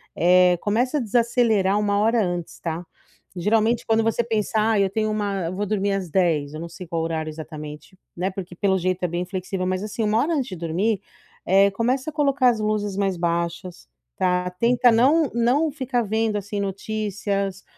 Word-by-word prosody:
eh, 180 0 +5
começa 245 +7 +1
a 285 - 0
desacelerar 225 -3 +2
1h 210 +2 +2
antes, 175 -2 -4
tá? 170 +1 -4 0.5
Geralmente 220 +5 +1
quando 225 0 +3
você 225 +1 +1
pensar: 220 0 0
"Ai 200 - +3
eu 195 - 0
tenho 215 0 0
uma 200 -4 -2
eu 180 - -4
vou 205 - -2
dormir 200 -1 0
às 195 -2 -2
22h.", 155 -5 +1
eu 155 - -6
não 170 0 -6
sei 175 +2 -9
qual 165 0 -2
horário 160 -1 -2
exatamente, 155 +2 -9 0.2
né, 180 +2 -1
porque 185 -2 -7
pelo 190 0 +1
jeito 185 0 -1
é - - +3
bem 175 +1 -3
flexível, 185 0 -4
mas 185 +1 -1
assim 215 +1 -3
1h 235 +10 +1
antes 265 -3 -1
de 185 - -6
dormir, 180 +6 -1 0.5
eh 195 +2 +5
começa 255 +8 -1
a - - -28
colocar 275 -4 +3
as 230 -2 0
luzes 210 -2 -1
mais 195 -3 0
baixas 170 - -3 0.3
tá, 180 0 +1
tenta 240 +5 +3
não 275 +6 +3
não 250 +7 +2
ficar 260 -4 -1
vendo 220 0 0
assim 205 +1 -4
notícias 200 -1 -3
200 Hz, 185 wpm, -23 LUFS, 180-225 Hz, 0.5 s, eh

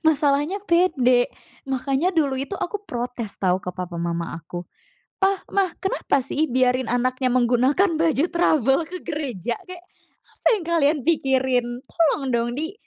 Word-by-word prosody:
Masalahnya 295 +4 +2
pede, 265 -9 +3 0.4
makanya 270 +6 0
dulu 300 -6 +1
itu 280 +9 -4
aku 410 +3 -3
protes 240 - -5
tau 185 -1 +2
ke 180 - -4
papa 180 -2 -5
mama 170 0 -3
aku. 175 +2 -7 0.5
"Pa, 390 0 +2
Ma! 395 -1 +2 0.2
Kenapa 280 -7 0
sih, 295 +4 0
biarin 255 0 +1
anaknya 255 +1 0
menggunakan 255 +9 +3
baju 325 -2 +2
trouble 305 -5 +3
ke 365 +2 -8
gereja? 245 - -3
Kayak 360 -1 -10 0.5
apa - - -22
yang 395 -6 -4
kalian 315 -3 +2
pikirin? 265 -6 +2 0.2
Tolong 295 -5 +1
dong 235 0 +1
di 320 +7 -3
270 Hz, 145 wpm, -23 LUFS, 245-330 Hz, 0.5 s, pede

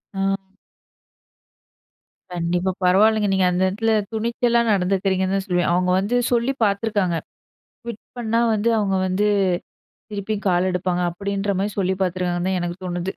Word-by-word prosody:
ஆ. 195 - -2 2.1
கண்டிப்பா 175 +2 0
பரவாலங்க, 210 +4 +4
நீங்க 190 -1 +2
அந்த 180 +1 -1
இடத்தில 220 +4 0 0.2
துணிச்சலா 235 +1 +1
நடந்துக்குறீங்கன்னு 190 0 +1
தான் 195 -1 -2
சொல்லுவேன். 180 -1 +1
அவங்க 180 +1 +1
வந்து 205 +6 -1 0.2
சொல்லி 240 +2 +1
பார்த்துருக்காங்க, 200 -4 0 0.7
குயிட் 235 -2 -7 0.2
பண்ணா 230 -1 0
வந்து 215 +2 0
அவங்க 195 -2 0
வந்து 185 +3 +1 0.9
திருப்பி 205 +1 -3
கால் 180 0 +2
எடுப்பாங்க, 180 0 -1
அப்டின்ற 200 +2 -2
மாரி 205 +2 -1
சொல்லி 190 0 +1
பார்த்துருக்காங்கன்னு 180 -1 -1
தான் 185 - 0
எனக்கு 175 0 -4
தோணுது 175 +1 -3
190 Hz, 130 wpm, -22 LUFS, 180-210 Hz, 2.1 s, பரவாலங்க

